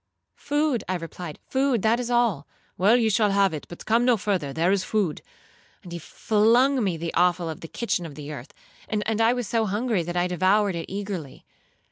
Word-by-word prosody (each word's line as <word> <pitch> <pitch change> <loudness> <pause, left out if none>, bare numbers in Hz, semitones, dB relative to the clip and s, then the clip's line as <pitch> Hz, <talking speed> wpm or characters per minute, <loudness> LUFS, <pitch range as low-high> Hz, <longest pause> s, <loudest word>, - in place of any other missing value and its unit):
'—'Food,' 290 -5 0
I 185 - 0
replied; 165 -1 -7
'food;—that 240 -4 +1
is 245 -1 -3
all.'—'Well, 215 - +1
you 225 -2 +2
shall 210 +1 +3
have 195 -2 +2
it—but 155 +3 -8
come 230 +2 +3
no 245 -2 +4
further—there 175 -4 0
is 195 -1 +1
food.' 200 -8 -1 0.6
And 175 - -11
he 170 - -5
flung 230 - +2
me 185 -5 -1
the 165 +1 -4
offal 175 -1 +2
of 160 - -6
the 165 - -7
kitchen 220 -3 -2
on 145 - -11
the 150 0 -7
earth; 135 -3 -9 0.4
and 215 +1 -1
I 225 +2 +4
was 245 -3 -3
so 225 +1 0
hungry, 210 0 0
that 175 +1 -4
I 175 - +2
devoured 190 +3 +2
it 165 +1 -6
eagerly. 195 -8 -6
200 Hz, 185 wpm, -25 LUFS, 170-230 Hz, 0.6 s, no